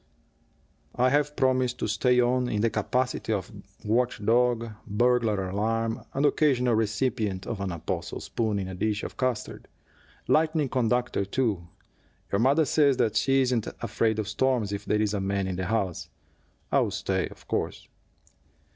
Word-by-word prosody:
"I 125 +1 +3
have 145 +1 +1
promised 130 -1 +1
to - - -2
stay 125 +5 +2
on, 125 0 +2
in 105 - 0
the 115 0 +2
capacity 125 +3 -1
of 100 -1 -2 0.3
watch 120 +3 +1
dog, 115 0 +2 0.2
burglar 110 -3 +1
alarm, 115 +3 -1
and 140 +2 +2
occasional 130 -5 +3
recipient 110 -3 -1
of 110 -4 -4
an 95 -1 -2
apostle 85 -2 -4
spoon 110 -3 -2
in 95 -2 -3
a 95 - -6
dish 105 +3 -1
of - - -6
custard. 130 -4 -3 0.6
Lightning 155 -2 +2
conductor, 125 -3 0
too 100 -4 -1 0.6
your 100 - +1
mother 140 +7 +4
says 140 -2 +3 0.2
she 135 0 +3
isn't 125 -3 0
afraid 110 -1 0
of 110 -2 -2
storms 110 -1 0
if 100 +1 -5
there 105 0 +1
is 105 -1 -1
a 100 - -1
man 100 0 -1
in 95 -1 -3
the 95 - -2
house. 95 -5 -2 0.6
I'll - - +3
stay, - - -1
of - - -16
course." - - -3
115 Hz, 155 wpm, -27 LUFS, 105-125 Hz, 0.6 s, mother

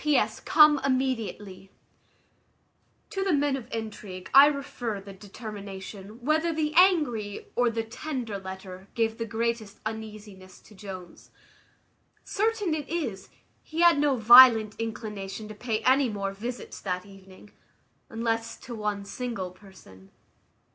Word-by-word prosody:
"P.S. 300 -1 +2
Come 300 -1 +6
immediately." 230 -8 -2 1.4
To 390 -3 -2
the 385 -3 +1
men 285 -1 +2
of 260 -4 -8
intrigue 210 -4 -7
I 275 +2 +10
refer 260 -7 -3
the 195 0 -11
determination, 200 +1 -9
whether 315 +3 +2
the 305 -1 -1
angry 295 - +3
or 245 -1 +3
the 230 0 -2
tender 235 -2 -5
letter 190 0 -9
gave 225 -1 0
the 230 - -3
greatest 225 -1 -2
uneasiness 215 -3 -8
to - - -18
Jones. 190 -3 -10 0.9
Certain 420 -4 0
it 300 -2 -4
is, 260 - -4 0.3
he 320 +2 -4
had 340 -4 +6
no 290 -2 +3
violent 230 -2 +8
inclination 215 -2 -5
to - - -7
pay 220 0 -3
any 260 0 +4
more 200 -2 -3
visits 235 +5 -7
that 180 -1 -3
evening, 195 0 -16 0.6
unless 230 0 -2
to 245 - -8
one 210 -2 -3
single 215 -5 -5
person. 180 - -17
225 Hz, 130 wpm, -27 LUFS, 200-265 Hz, 1.4 s, I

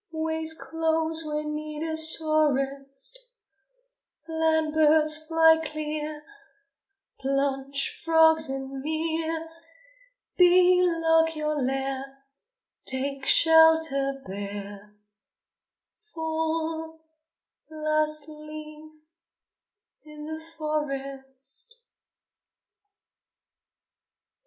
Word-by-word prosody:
Ways 320 0 -2
close 325 0 0
when 300 0 -3
need 305 0 -5
is 315 0 +4
sorest: 275 - -1 1.1
Land 320 -1 0
birds, 310 0 +4
fly 325 0 +5
clear! 305 -1 -5 1.0
Plunge, 275 0 -2
frogs, 320 -2 +4
in 270 0 -5
mere! 320 +2 -2 0.9
Bee, 360 0 +6
lock 325 -1 +2
your 305 0 -2
lair! 270 +1 -3 0.7
Take 270 +1 -3
shelter, 320 -4 +4
bear! 200 +1 -8 1.2
Fall, 320 0 -3 0.6
last 310 -1 -2
leaf 305 0 -11 1.1
in 300 -1 -11
the 315 +1 -6 0.2
forest! 275 - -5
310 Hz, 65 wpm, -26 LUFS, 275-320 Hz, 1.2 s, Bee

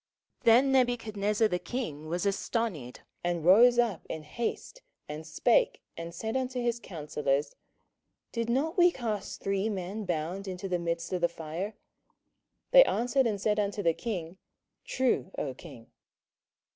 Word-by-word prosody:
27:003:024 - - -34
Then 245 +4 +6
Nebuchadnezzar 225 -4 +2
the 180 -4 -1
king 155 - -5
was 175 +4 -2
astonied, 200 - -2 0.2
and 175 -2 -1
rose 235 +7 +7
up 230 -7 +1
in 160 - -5
haste, 235 - -4 0.3
and 150 +1 -7
spake, - - +2
and 165 0 -6
said 220 +7 -4
unto 255 -1 -1
his 240 -1 0
counsellors, 150 -6 -2 0.8
Did 230 -1 -2
not 310 +9 0
we 350 0 +8
cast 225 - -4
three 195 +2 0
men 200 +1 -4
bound 175 +3 -3
into 185 +1 -4
the 180 -2 0
midst 170 +1 -3
of 180 - -1
the 175 - +3
fire? 170 +6 -5 1.0
They - - +10
answered 250 - +1
and 210 -3 -1
said 210 +1 +1
unto 205 0 -1
the 165 -1 +3
king, 185 -4 -5 0.5
True, 260 -7 0
O 135 - -2
king. 115 -2 -13
200 Hz, 150 wpm, -29 LUFS, 170-235 Hz, 1.0 s, They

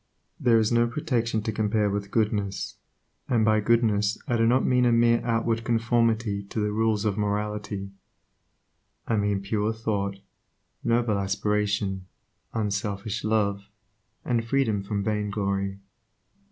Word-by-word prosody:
There 120 -3 +4
is 110 0 +2
no 120 0 +3
protection 115 -4 -1
to 110 - -1
compare 105 0 +1
with 100 0 -2
goodness, 105 -3 -1 0.5
and 115 -3 +3
by 110 0 +4
"goodness" 105 -1 +2
I 120 - +1
do 115 0 +3
not 125 +3 +3
mean 125 -1 +3
a 120 - +4
mere 115 0 +4
outward 115 -1 0
conformity 115 -2 +1
to 100 +2 -5
the 105 0 0
rules 110 -1 +1
of 105 -1 0
morality; 105 -1 -2 1.2
I 115 - +1
mean 100 -1 0
pure 105 +2 0
thought, 100 -3 -2 0.7
noble 115 -3 +1
aspiration, 100 -1 -1 0.4
unselfish 105 0 -2
love, 100 -2 0 0.6
and 120 -2 +1
freedom 115 -4 +1
from 100 0 -3
vainglory. 100 -2 -1
105 Hz, 130 wpm, -26 LUFS, 100-115 Hz, 1.2 s, There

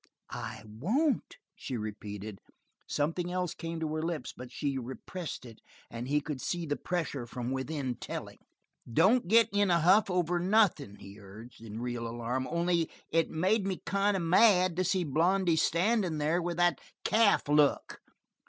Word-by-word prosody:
"I - - -6
won't!" 220 - 0 0.2
she 135 - -5
repeated. 105 -1 -6 0.5
Something 165 +4 -1
else 180 -2 -1
came 165 -1 -5
to 155 -1 -2
her 155 - -1
lips, 160 -5 -3
but 125 0 -10
she 140 0 -2
repressed 130 +5 -7
it, 115 -3 -12 0.3
and 120 +2 -5
he 150 +2 +1
could 145 -3 -5
see 175 -1 -2
the 145 -2 -1
pressure 155 -9 -3
from 125 +1 -4
within 130 -1 -3
telling. - - -7 0.5
"Don't 190 - +4
get 225 +3 +6
in 205 -1 +3
a 170 -1 +4
huff 190 +6 +5
over 175 -1 +1
nothing," 180 - +2
he 100 +1 -12
urged, 110 +4 -13
in 110 0 -7
real 120 -1 -3
alarm. 120 +3 -3
"Only, 170 -1 +1 0.2
it 165 0 +2
made 190 +5 +1
me 190 -2 -2
kind 200 0 +1
of 180 - -2
mad 185 0 +5
to 185 - +2
see 185 0 +1
Blondy 170 +4 +2
standing 180 +1 +1
there 155 +4 +1
with 170 0 -3
that 175 0 +2 0.2
calf 215 -6 +3
look." 145 -1 +2
165 Hz, 165 wpm, -30 LUFS, 130-185 Hz, 0.5 s, get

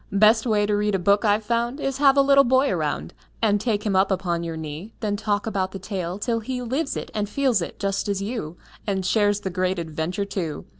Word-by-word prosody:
Best 215 +3 +5
way 210 -2 +2
to 210 0 +1
read 210 0 +1
a - - +3
book 200 +4 +2
I've 210 0 +2
found 235 +4 -1
Is 275 -1 -2
have 280 -1 +5
a 275 - +6
little 275 0 +6
boy 260 +2 +3
around - - -2 0.3
And 205 -2 +2
take 215 -3 -1
him 200 -3 +1
up 190 +1 +4
upon 180 -3 -1
your 165 -1 -4
knee; 160 +7 -7
Then 210 -2 -1
talk 205 -1 -1
about 190 -4 -2
the - - -4
tale, 185 -2 -4
till 230 +2 -1
he 250 +3 -4
Lives 265 +5 -2
it - - -6
and 210 -1 -2
feels 255 -4 +1
it, 170 - -5
just 195 0 -2
as 200 -1 0
you, 195 -6 -4 0.3
And 190 -2 -1
shares 205 0 +2
the 190 - -3
great 185 +1 0
adventure, 165 +4 -3
too. 170 -7 -4
205 Hz, 235 wpm, -24 LUFS, 190-230 Hz, 0.3 s, a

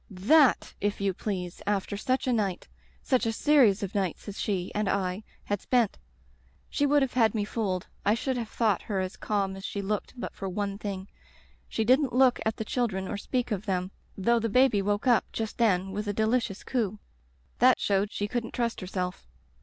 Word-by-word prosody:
" - - -25
Thaty 250 +9 +4
if 205 0 -1
you 200 -1 0
please, 180 -3 -4
after 205 -1 0
such 255 +6 0
a 255 - +2
night 200 -5 -1 0.2
— - - -33
such 255 -2 +3
a - - +2
series 230 -6 +4
of 195 - -4
nights 195 -2 -2
as 205 - -6
she 185 -4 -1
— - - -24
^and 210 -1 0
I 190 +1 -1
— - - -32
^had 205 - 0
spent. 240 -5 +1 0.7
She 285 - +2
would 290 0 +4
have 265 - -2
had 225 -3 +3
me 210 -2 0
fooled 195 -4 -2
— - - -34
I 205 +2 +3
should 260 +3 -2
have 235 -3 -3
thought 215 -5 +1
her 200 -3 -2
as 185 0 -3
calm 200 -2 -1
as 195 - -9
she 200 - -4
looked 210 +5 -3
but - - -5
for 195 - -5
one 200 +1 -3
thing. 195 -2 -5 0.6
She 225 - 0
didn't 260 +2 +3
look 255 0 +4
at 220 - -1
the 220 - -3
children 210 -6 -1
or 205 - -3
speak 245 +3 -2
of 210 0 -3
them, 185 -1 -1 0.3
though 235 +5 +3
the 230 0 -1
baby 250 -2 +4
woke 205 +3 -1
up 245 -3 +3
just 220 +1 -4
then 195 -4 +2
with 210 +2 -4
a 205 - 0
delicious 220 -1 0
coo. 220 -6 -1 0.6
That 255 +1 +6
showed 200 +1 +1
she 205 - -2
couldn't 235 +1 -3
trust 235 -1 -1
herself. 180 - -4
210 Hz, 215 wpm, -28 LUFS, 195-235 Hz, 0.7 s, That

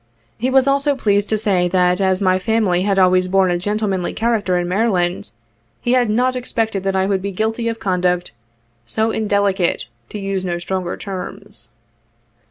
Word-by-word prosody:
He 250 +3 0
was 265 0 +4
also 280 +1 +2
pleased 205 -4 +1
to 220 - +2
say 190 -4 +2
that 180 +1 +2
as 190 0 +1
my 185 -1 +3
family 205 -4 +1
had 195 0 0
always 185 -1 +4
borne 190 -1 +3
a 175 - 0
gentlemanly 200 -2 -1
character 215 -5 0
in 175 0 -1
Maryland 180 - 0 0.5
he 240 - -1
had 250 -3 +3
not 250 +4 +1
expected 225 -5 -2
that 195 0 0
I 190 0 +2
would 195 -1 0
be 200 +1 -3
guilty 220 +4 -2
of 230 0 -2
conduct 180 -2 0 0.2
' 115 0 -42
' 120 - -42
so 220 - 0
indelicate, 200 - 0 0.2
to - - -6
use 195 -2 -3
no 175 -2 -2
stronger 180 0 -3
terms." 195 - -7
195 Hz, 180 wpm, -19 LUFS, 180-220 Hz, 0.5 s, was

